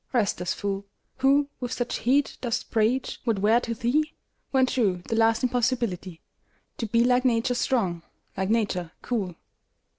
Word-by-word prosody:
Restless 190 -6 0
fool, 200 0 -3 0.3
Who 275 +2 +4
with 245 -2 -3
such 245 0 -2
heat 275 +4 +1
dost 240 -3 -2
preach 230 +4 +1
what 230 -4 +1
were 215 +4 +4
to 230 -1 -4
thee, 290 +7 0 0.3
When 265 -1 +4
true, 200 -9 0
the 225 - -1
last 225 +2 +3
impossibility 235 -8 -1 0.6
To 230 - -2
be 230 +2 +3
like 250 +1 +3
Nature 245 0 +2
strong, 210 -9 0 0.3
like 190 0 -1
Nature 195 -7 0
cool! 200 -8 -2
230 Hz, 150 wpm, -26 LUFS, 200-250 Hz, 0.6 s, Who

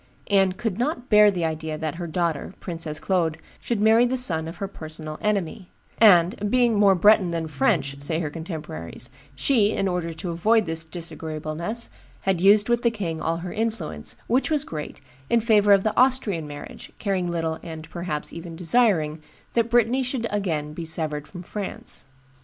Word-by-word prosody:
Anne 195 -2 +4
could 210 0 -3
not 250 -1 -2
bear 210 -1 +7
the 180 -4 -1
idea 160 -1 -3
that 160 +1 -4
her 170 - -3
daughter, 170 0 -2
Princess 165 -4 -4
Claude, 170 -5 0 0.2
should 235 -3 -2
marry 220 +3 +5
the 250 +1 +1
son 160 -10 +1
of 165 - -8
her 195 - -3
personal 155 -4 -7
enemy; 200 -2 -1 0.3
and, 195 -1 +5
being 245 0 +3
more 205 -2 +5
Breton 195 0 +5
than 165 -1 -2
French, 140 -1 0
say 160 +3 0
her 155 -3 -3
contemporaries, 150 - -6 0.2
she, 210 - +3
in 195 - 0
order 180 -2 -2
to 170 +2 -5
avoid 215 +6 +3
this 165 0 -1
disagreeableness, 165 +4 -5 0.3
had 190 -3 0
used 205 +2 +6
with 240 0 +2
the 235 - +3
king 180 -8 -4
all 165 +1 0
her 175 +1 -6
influence, 220 - -2
which 255 +6 +1
was 300 -2 +1
great, 150 - -7 0.3
in 235 - +4
favor 210 -3 +4
of 195 -1 +6
the 215 - 0
Austrian 235 - +2
marriage, 145 0 -9
caring 190 -4 -1
little, 165 -2 -2
and, 160 -1 -8
perhaps, 170 -4 -4
even 170 0 -8
desiring, 165 -5 +2 0.3
that 230 0 +1
Brittany 240 +2 +3
should 255 -1 -2
be - - 0
again 160 -7 -2
severed 155 -2 -1
from 180 -2 -9
France. 200 +2 -4
180 Hz, 175 wpm, -24 LUFS, 160-215 Hz, 0.3 s, bear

